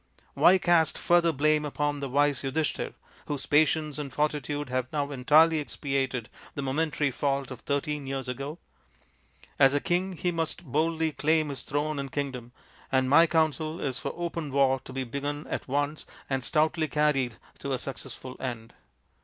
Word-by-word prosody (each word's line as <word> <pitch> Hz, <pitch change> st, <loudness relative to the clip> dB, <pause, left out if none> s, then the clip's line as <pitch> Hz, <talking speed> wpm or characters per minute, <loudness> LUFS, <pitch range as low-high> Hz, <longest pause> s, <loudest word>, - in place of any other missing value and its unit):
Why 185 Hz, -, +6 dB
cast 170 Hz, -3 st, +3 dB
further 175 Hz, -1 st, +3 dB
blame 155 Hz, +1 st, +2 dB
upon 145 Hz, 0 st, -1 dB
the 140 Hz, -1 st, -4 dB
wise 145 Hz, 0 st, +2 dB
Yudhishthir, 145 Hz, +3 st, -2 dB, 0.3 s
whose 145 Hz, -2 st, -3 dB
patience 155 Hz, 0 st, +2 dB
and 140 Hz, -2 st, -5 dB
fortitude 145 Hz, -1 st, -1 dB
have 130 Hz, 0 st, -2 dB
now 145 Hz, -1 st, -1 dB
entirely 155 Hz, +5 st, +5 dB
expiated 135 Hz, -4 st, -2 dB, 0.3 s
the 140 Hz, -, -3 dB
momentary 150 Hz, +1 st, 0 dB
fault 135 Hz, 0 st, -1 dB
of 125 Hz, -, -7 dB
thirteen 145 Hz, +1 st, -2 dB
years 135 Hz, -1 st, -3 dB
ago? 140 Hz, +5 st, -4 dB, 1.0 s
As 135 Hz, 0 st, +6 dB
a -, -, +3 dB
king 185 Hz, +4 st, 0 dB
he 180 Hz, +1 st, -1 dB
must 165 Hz, +1 st, -2 dB
boldly 160 Hz, +3 st, 0 dB
claim 155 Hz, +1 st, +1 dB
his 135 Hz, -3 st, -4 dB
throne 150 Hz, +1 st, -2 dB
and 135 Hz, -1 st, -5 dB
kingdom, 130 Hz, -4 st, -4 dB, 0.4 s
and 130 Hz, -1 st, +2 dB
my 165 Hz, +3 st, +7 dB
counsel 160 Hz, 0 st, 0 dB
is 135 Hz, -2 st, -2 dB
for -, -, -3 dB
open 170 Hz, -3 st, -4 dB
war 135 Hz, -1 st, +3 dB
to -, -, -9 dB
be 130 Hz, 0 st, -2 dB
begun 145 Hz, +4 st, -4 dB
at -, -, -3 dB
once 145 Hz, +3 st, -1 dB, 0.2 s
and 135 Hz, -2 st, -1 dB
stoutly 155 Hz, +2 st, +1 dB
carried 145 Hz, -6 st, +1 dB, 0.2 s
to 140 Hz, -, -4 dB
a 130 Hz, -, +1 dB
successful 130 Hz, 0 st, -7 dB
end. 120 Hz, -3 st, -5 dB
145 Hz, 165 wpm, -28 LUFS, 135-155 Hz, 1.0 s, my